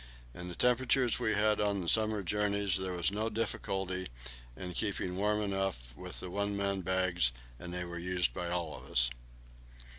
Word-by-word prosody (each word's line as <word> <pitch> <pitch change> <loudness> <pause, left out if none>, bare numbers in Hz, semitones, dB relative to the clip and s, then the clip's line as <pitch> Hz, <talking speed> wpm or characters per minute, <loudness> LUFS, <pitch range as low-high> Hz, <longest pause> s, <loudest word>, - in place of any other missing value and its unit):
In 90 +7 -7
the 90 - -6
temperatures 125 +1 +3
we 110 - +1
had 105 0 +3
on 100 -2 +1
the 85 - -5
summer 110 0 +3
journeys 100 0 +1
there 95 -1 -2
was 85 +1 +1
no 110 +2 -1
difficulty 95 -4 -2 0.5
in 90 -1 -5
keeping 95 -3 -1
warm 105 +2 +1
enough 95 -12 -2
with - - -6
the 90 - -6
one 100 +1 -1
man 100 -1 0
bags, 90 -7 +3 0.3
and 85 - -7
they 90 0 -3
were 85 0 -6
used 90 0 +1
by 85 - -3
all 85 -3 -2
of - - -12
us. - - +4
95 Hz, 180 wpm, -33 LUFS, 90-105 Hz, 0.5 s, us